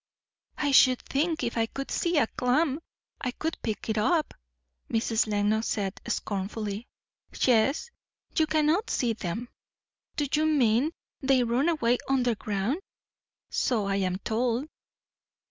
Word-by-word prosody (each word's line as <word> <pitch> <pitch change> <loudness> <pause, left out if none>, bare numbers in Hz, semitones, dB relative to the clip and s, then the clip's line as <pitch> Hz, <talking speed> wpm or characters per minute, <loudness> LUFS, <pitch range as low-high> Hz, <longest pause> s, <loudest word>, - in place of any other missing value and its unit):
"I 285 -1 +1
should 255 -2 +6
think, 315 +4 0
if 235 - -2
I 225 -1 +1
could 275 +4 -6
see 340 -1 +1
a 260 - +5
clam, 265 +6 +1 0.4
I 255 - -1
could 320 +6 -3
pick 220 -2 -3
it 220 -1 0
up," 315 +8 +1 0.6
Mrs. 225 0 +1
Lenox 210 +1 +1
said 195 -2 -2
scornfully. 205 0 -3 0.5
"Yes; 260 - +3 0.4
you 315 - +3
cannot 315 +8 +2
see 240 -3 +1
them." 220 +3 -4 0.7
"Do 295 - 0
you 310 +1 +3
mean, 260 -2 +3 0.3
they 265 -2 +3
run 245 +7 +2
away 245 -7 +2
under 250 -3 +2
ground?" 210 - -2 0.7
"So 225 -5 +1
I 195 0 0
am 185 -2 0
told." 240 +6 -1
245 Hz, 135 wpm, -28 LUFS, 220-290 Hz, 0.7 s, should